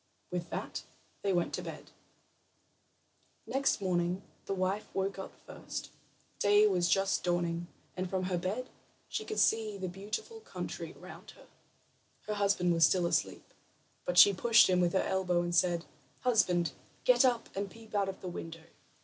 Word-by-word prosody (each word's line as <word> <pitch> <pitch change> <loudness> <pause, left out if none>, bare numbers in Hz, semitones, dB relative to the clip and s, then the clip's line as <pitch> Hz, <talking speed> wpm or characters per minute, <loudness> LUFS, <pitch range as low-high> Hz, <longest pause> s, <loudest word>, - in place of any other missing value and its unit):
With 175 -1 -3
that - - -4 0.4
they 200 - +1
went 175 -2 0
to - - -2
bed. - - -9 1.5
Next 275 +1 +1
morning 180 -1 0 0.2
the - - -1
wife 190 +3 -1
woke 195 0 -1
up 190 - -6
first; - - -7 0.5
day 205 +1 +5
was 180 -4 +2
just 195 +3 +2
dawning, 175 -1 0 0.3
and 185 0 -3
from 185 0 -1
her 180 -1 -1
bed 205 +8 -3 0.4
she 430 - -2
could 435 0 -5
see 220 -2 +2
the 190 -1 -4
beautiful 210 - -5
country 445 - -6
around - - -11
her. - - -16 0.8
Her 210 - -3
husband 200 -4 +2
was 165 -1 +3
still 175 +3 +4
asleep, 170 - -1 0.5
but 180 - -2
she 200 - +9
pushed 230 +5 +6
him 180 -1 +3
with 175 +1 +2
her 190 - +2
elbow, 180 -2 +1
and 175 0 -3
said: 175 -1 +2 0.4
"Husband, 180 -9 +2 0.3
get - - +5
up 245 -3 +2
and 200 0 -2
peep 225 +1 -15
out 200 -2 +1
of 190 - -7
the 185 - -6
window. 165 -2 -7
190 Hz, 165 wpm, -32 LUFS, 175-205 Hz, 1.5 s, she